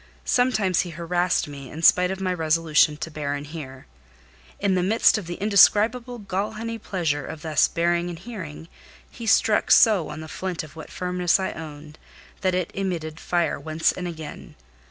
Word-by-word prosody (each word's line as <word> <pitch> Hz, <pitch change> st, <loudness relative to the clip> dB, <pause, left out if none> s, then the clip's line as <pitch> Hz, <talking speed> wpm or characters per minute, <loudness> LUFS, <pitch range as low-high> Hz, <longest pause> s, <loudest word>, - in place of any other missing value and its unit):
Sometimes 220 Hz, -8 st, +2 dB
he 175 Hz, -, 0 dB
harassed 175 Hz, +1 st, 0 dB
me, 140 Hz, -3 st, -9 dB
in 160 Hz, +2 st, -8 dB
spite 180 Hz, +2 st, +6 dB
of 190 Hz, 0 st, -4 dB
my 185 Hz, -1 st, -1 dB
resolution 155 Hz, -2 st, +2 dB
to 155 Hz, +2 st, -6 dB
bear 145 Hz, -2 st, -3 dB
and 145 Hz, 0 st, -6 dB
hear; 140 Hz, -4 st, -9 dB, 0.7 s
in 195 Hz, -, +1 dB
the 185 Hz, -, +2 dB
midst 215 Hz, +3 st, +3 dB
of 185 Hz, -, -9 dB
the 175 Hz, -, -4 dB
indescribable 220 Hz, +5 st, +3 dB
gall 200 Hz, 0 st, -3 dB
honey 230 Hz, +1 st, -5 dB
pleasure 160 Hz, -8 st, -2 dB
of 160 Hz, +4 st, -8 dB
thus 155 Hz, -2 st, +3 dB
bearing 170 Hz, +1 st, 0 dB
and 170 Hz, -, -6 dB
hearing, 170 Hz, -6 st, -8 dB, 0.4 s
he 230 Hz, -, -8 dB
struck 215 Hz, 0 st, +3 dB
so 205 Hz, -8 st, +5 dB
on 150 Hz, -, -7 dB
the 155 Hz, -, -8 dB
flint 180 Hz, +1 st, -4 dB
of 155 Hz, -1 st, -13 dB
what 160 Hz, -, -9 dB
firmness 180 Hz, 0 st, 0 dB
I 190 Hz, -, -2 dB
owned, 155 Hz, -1 st, -10 dB, 0.4 s
that 185 Hz, -1 st, +1 dB
it 180 Hz, -2 st, -2 dB
emitted 170 Hz, -5 st, -3 dB
fire 175 Hz, -2 st, 0 dB
once 160 Hz, 0 st, 0 dB
and 180 Hz, -1 st, -5 dB
again. 160 Hz, -3 st, -9 dB
175 Hz, 180 wpm, -24 LUFS, 155-190 Hz, 0.7 s, spite